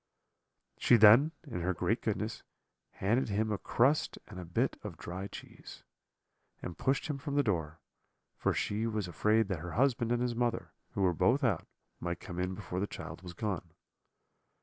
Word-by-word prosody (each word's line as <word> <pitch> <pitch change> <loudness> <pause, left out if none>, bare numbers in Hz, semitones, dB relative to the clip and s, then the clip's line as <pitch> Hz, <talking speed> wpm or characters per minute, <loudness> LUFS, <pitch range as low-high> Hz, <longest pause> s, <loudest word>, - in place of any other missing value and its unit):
"She 125 - +6
then, 115 +8 +8
in 115 - -4
her 90 +1 0
great - - 0
goodness, - - -2 0.5
handed 115 +6 +1
him 110 +2 0
a 105 - -1
crust 135 +6 +2
and 95 - -9
a 90 - -6
bit 115 +11 0
of 100 -7 -6
dry 95 +4 -5
cheese, - - -11 0.8
and 90 - -6
pushed 135 +1 0
him 145 -3 -3
from 140 +1 -4
the 145 - +4
door; 85 - -1 0.6
for - - +1
she 110 +2 -1
was 105 -4 -2
afraid 105 +7 +2
that 95 -4 -1
her 85 +2 -6
husband 120 -2 +2
and 120 - +2
his 125 -1 0
mother, 120 0 -1 0.2
who 100 - 0
were 90 -2 +4
both 130 - +3
out, 125 - +1 0.3
might 85 0 -3
come 90 0 -7
in 90 +1 -1
before 90 -3 -4
the 100 - 0
child - - -8
was 90 -1 -8
gone. 90 -4 -3
105 Hz, 180 wpm, -32 LUFS, 90-120 Hz, 0.8 s, then